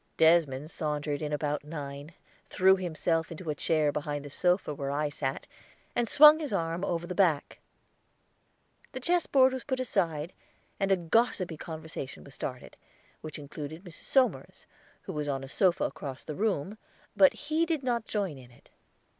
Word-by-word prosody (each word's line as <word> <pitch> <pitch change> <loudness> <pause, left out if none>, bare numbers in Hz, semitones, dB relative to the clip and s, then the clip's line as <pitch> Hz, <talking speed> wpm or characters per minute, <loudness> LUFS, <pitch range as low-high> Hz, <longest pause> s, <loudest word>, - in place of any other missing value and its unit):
Desmond 160 -3 +3
sauntered 150 -1 -2
in 150 -1 -3
about 150 0 -1
nine, 145 -1 -7 0.4
threw 190 +1 +5
himself 165 -2 -1
into 165 -1 -5
a - - -1
chair 150 0 +1
behind 145 -1 -3
the 145 - -8
sofa 180 0 +1
where 140 -1 -4
I 145 +1 0
sat, 135 -2 -3 0.5
and 240 -1 +1
swung 300 +1 +9
his 300 -4 -4
arm 165 -2 -1
over 175 -3 -1
the 180 - -5
back. 170 -7 +1 1.3
The 260 - -4
chessboard 270 -4 +3
was 260 - -4
put 260 -2 -2
aside, 170 -9 -1 0.5
and 195 -1 +1
a 190 - +5
gossipy 180 -1 +1
conversation 160 -3 -7
was 140 - -12
started, 130 -1 -6 0.4
which 155 -1 -7
included 150 +3 -8
Mrs. 175 -5 -12
Somers, 265 -2 +1 0.4
who - - -6
was 150 -1 -2
on 135 -1 -2
a - - -7
sofa 180 +5 +2
across 135 -3 -5
the 155 - -5
room, 205 +1 -1 0.4
but 195 -2 +6
he 310 +3 -1
did 315 -4 -1
not 240 -3 -1
join 195 -10 -2
in 125 -2 -14
it. 120 - -22
165 Hz, 165 wpm, -29 LUFS, 145-200 Hz, 1.3 s, swung